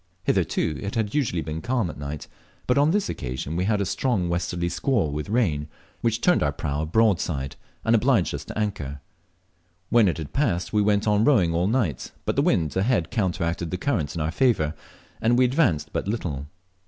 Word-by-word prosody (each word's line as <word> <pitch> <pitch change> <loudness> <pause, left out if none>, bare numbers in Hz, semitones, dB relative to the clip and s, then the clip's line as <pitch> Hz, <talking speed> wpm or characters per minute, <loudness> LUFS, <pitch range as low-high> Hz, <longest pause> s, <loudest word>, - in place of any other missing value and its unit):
Hitherto 75 - 0
it 100 +1 -4
had 110 -2 -1
usually 115 - 0
been 80 0 -4
calm 120 -3 0
at 75 - -7
night, 70 +1 -6 0.4
but 125 - +2
on 145 +2 +4
this 205 +3 +1
occasion 65 +4 -4
we 90 +2 0
had 105 0 +1
a 100 - 0
strong 100 -6 0
westerly 85 0 -1
squall 100 - 0
with 75 +5 -4
rain, 85 -11 +1 0.3
which 115 0 0
turned 180 - +4
our 70 - +2
prau 75 +1 -2
broadside, 85 -8 +1 0.3
and - - +3
obliged - - +2
us - - -4
to - - -7
anchor. 75 -10 -2 0.9
When 115 -3 +5
it 90 - 0
had 80 -3 -7
passed 110 -12 0
we 105 - +3
went 105 0 +2
on 105 0 +3
rowing 100 - +4
all 85 +2 +1
night, 105 - -1
but - - 0
the - - +3
wind 80 -4 +1
ahead 95 -2 +1
counteracted 90 -6 -1
the 90 - -2
current 90 - -1
in 85 - -2
our 80 +1 0
favour, 90 - +2 0.5
and 120 +2 +3
we 130 - +5
advanced 125 - +1
but - - -2
little. 80 - -3
95 Hz, 195 wpm, -25 LUFS, 80-115 Hz, 0.9 s, When